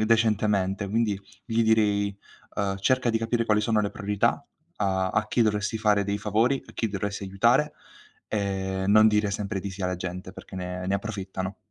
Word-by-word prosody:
decentemente, 105 -3 +2
quindi 105 -2 0 0.2
gli 115 -1 +1
direi, 105 -3 +2 0.4
uhm: 100 -1 -1
"Cerca 125 +4 +2
di 115 - +1
capire 115 +1 0
quali 105 -2 +3
sono 110 0 +2
le 100 - -1
priorità, 105 -1 0 0.3
a 95 -2 +1
a 110 +2 0
chi 120 - +2
dovresti 105 0 0
fare 105 -2 +2
dei 100 +1 -1
favori, 110 +6 +1
a - - -13
chi 115 - -1
dovresti 100 0 -3
aiutare, 115 +10 +2 0.5
e 95 -2 -2
non 110 +2 +7
dire 105 -1 +2
sempre 100 0 -3
di 100 - -5
sì 95 +1 -7
alla 90 0 0
gente 90 +1 -6
perché 95 - -10
ne 90 0 -4
ne 95 - +1
approfittano." 95 -2 -4
105 Hz, 180 wpm, -26 LUFS, 95-110 Hz, 0.5 s, non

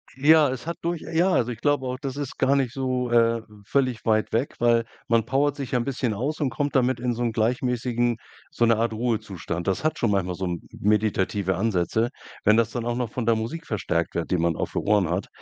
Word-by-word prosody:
Ja, 150 +2 +5
es 130 +3 -5
hat 170 -1 -3
durch 170 -1 -2
ja, 170 +3 +1
also, 125 -9 +1
ich 115 - -7
glaube 145 -3 +1
auch, 125 0 -3
das 135 +1 -5
ist 145 -3 -5
gar 140 - +3
nicht 135 -4 +1
so, 130 -2 -1
äh, 115 -1 +3 0.2
völlig 130 -2 0
weit 110 -1 +2
weg, 120 +5 -1
weil 115 -1 +3 0.2
man 115 -2 +2
powert 145 +2 +1
sich 135 -3 -6
'n 125 -1 +2
bisschen 130 -4 -1
aus 140 +9 -2
und 145 -4 +1
kommt 145 +4 -2
damit 130 -2 +2
in 120 0 0
so 120 +1 -3
'n 120 - +1
gleichmäßigen 120 +1 0 0.3
so 120 - +2
'ne 115 0 +4
Art 115 0 0
Ruhezustand. 105 -7 -3
Das 95 +6 0
hat 155 +1 0
schon 115 - +1
manchmal 90 -3 0
so 95 - -3
'n 85 -1 -3
m - - -13
meditative 105 -2 +1
Ansätze, 110 +2 +1 0.3
wenn 105 +1 +5
das 115 -1 +3
dann 120 -1 -3
auch 120 0 -1
noch 125 -2 -2
von 125 0 -3
der 115 0 +4
Musik 140 +10 -4
verstärkt 90 - -1
wird, 85 - -2
die 90 - +2
man 85 -1 +1
auf - - -3
den - - 0
Ohren 100 -4 +2
hat. 90 +3 -1
120 Hz, 235 wpm, -25 LUFS, 110-130 Hz, 0.3 s, Ja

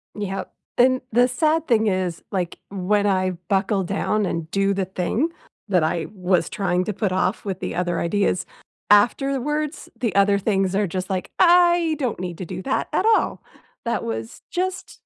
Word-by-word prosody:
Yep. 195 -2 -4 0.2
Then 255 +1 +4
the 245 +2 +4
sad 315 +5 +1
thing 220 -3 +3
is, 185 -3 -1
like, 180 -3 -2
when 200 +2 0
I 185 -2 +2 0.2
buckle 195 0 +1
down 200 +3 0
and 165 -3 -3
do 195 0 +2
the 195 -1 -1
thing 190 - -1 0.4
that 180 -5 +3
I 160 0 -1
was 180 -3 +1
trying 180 -3 0
to 210 - -2
put 200 -2 -1
off 185 +3 0
with 190 -1 -3
the - - -4
other 175 -1 -1
ideas 185 +1 0 0.4
afterwards, 275 +8 +2
the 230 -5 0
other 200 0 +4
things 195 -2 0
are 205 -1 +2
just 185 +3 -4
like, 185 -1 -3
"I 345 -2 +5
don't 250 -8 -2
need 180 -2 -5
to 185 - -4
do 185 - -6
that 270 - -1
at - - +1
all. - - -1 0.4
That 235 0 -1
was 110 0 -5
just 370 +1 -3
200 Hz, 175 wpm, -23 LUFS, 185-245 Hz, 0.4 s, I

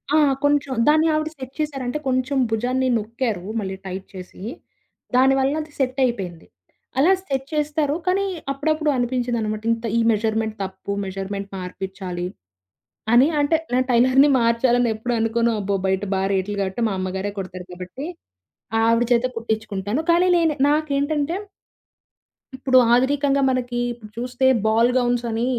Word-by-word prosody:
ఆ! - - +6 0.3
కొంచెం 285 -2 +2
దాన్ని 310 +2 +5
ఆవిడ 310 0 0
సెట్ 260 0 -8
చేసారంటే, 275 -3 -2
కొంచెం 255 +2 0
భుజాన్ని 250 +4 0
నొక్కారు 225 -3 -3 0.2
మళ్ళీ 190 -2 -4
టైట్ 190 +1 -6
చేసి. 185 0 -10 0.7
దానివల్ల 270 +2 +4
అది 305 0 -10
సెటపేంది. 240 -10 -1 0.5
అలా 335 +7 +5
సెట్ 270 -3 -2
చేస్తారు. 300 0 0
కానీ 390 +2 +2 0.3
అప్పుడప్పుడు 310 +2 0
అనిపించిందన్నమాట 240 -3 -1
ఇంత 230 0 -2
ఈ - - +3
మెజర్‌మెంట్ 220 0 0
తప్పు, 190 +1 -6
మెజర్‌మెంట్ 195 +1 -5
మార్పించాలి, 180 -1 -5 0.9
అని 255 +5 +7
అంటే 315 +3 +3 0.2
నా 255 - +4
టైలర్‌ని 260 +4 +5
మార్చాలనేప్పుడు 235 0 +1
అనుకోను. 230 +1 +1
అబ్బో! 195 0 0
బయట 190 +1 0
బా 190 - 0
రేట్లు 200 +2 -1
గాబట్టి 195 +5 -2
మా - - -2
అమ్మగారే 190 +2 -3
కుడతారు 185 -1 -7
కాబట్టి 180 +11 -7 0.8
ఆవిడ 230 +1 +3
చేతె 240 +1 +4
కుట్టించుకుంటాను. 220 +2 -2
కానీ 355 +2 +4
నేను 325 -2 +2 0.2
నాకేంటంటే 295 +1 0 1.2
ఇప్పుడు 260 0 +3 0.2
ఆధునికంగా 275 +2 +2
మనకి 245 -1 -1
ఇప్పుడు 225 -3 -10
చూస్తే 250 +2 -1 0.2
బాల్ 230 +2 +4
గౌన్స్‌ 245 -1 +1
అని 230 +2 0
240 Hz, 130 wpm, -22 LUFS, 205-275 Hz, 1.2 s, అని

